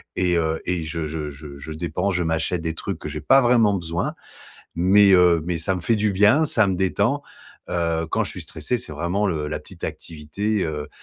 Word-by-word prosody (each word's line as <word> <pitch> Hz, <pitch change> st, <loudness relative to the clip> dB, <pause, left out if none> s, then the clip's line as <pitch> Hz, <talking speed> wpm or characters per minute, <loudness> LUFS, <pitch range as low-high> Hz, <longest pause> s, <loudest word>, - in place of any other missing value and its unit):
et 90 Hz, -1 st, +1 dB
heu 80 Hz, -1 st, 0 dB
et 90 Hz, -2 st, -1 dB
je 80 Hz, 0 st, -4 dB
je 75 Hz, -1 st, -4 dB
je 70 Hz, 0 st, -11 dB
je 75 Hz, +3 st, -8 dB
dépense, 85 Hz, +4 st, -2 dB
je 90 Hz, -, +1 dB
m'achète 80 Hz, +1 st, -1 dB
des 80 Hz, -1 st, -3 dB
trucs -, -, -5 dB
que -, -, -6 dB
j'ai 75 Hz, 0 st, -6 dB
pas 135 Hz, -, +5 dB
vraiment 120 Hz, -4 st, +4 dB
besoin 85 Hz, -3 st, -2 dB, 0.6 s
mais, 95 Hz, +3 st, +5 dB
heu, 90 Hz, -2 st, +5 dB
mais 90 Hz, -2 st, -1 dB
ça 85 Hz, +4 st, 0 dB
me -, -, -5 dB
fait 115 Hz, -, +1 dB
du 105 Hz, 0 st, +1 dB
bien, 105 Hz, +11 st, +4 dB
ça 110 Hz, -6 st, +3 dB
me 95 Hz, -, 0 dB
détend. 100 Hz, +9 st, +1 dB, 0.5 s
Heu, 85 Hz, -1 st, -1 dB
quand -, -, +1 dB
je -, -, -3 dB
suis -, -, -5 dB
stressé, 125 Hz, -, -3 dB
c'est 120 Hz, -, -8 dB
vraiment 85 Hz, +7 st, -1 dB
le 80 Hz, -6 st, -2 dB
la 75 Hz, 0 st, -4 dB
petite -, -, -11 dB
activité, 90 Hz, +7 st, -3 dB
heu, 75 Hz, -2 st, -4 dB
85 Hz, 220 wpm, -23 LUFS, 80-100 Hz, 0.6 s, pas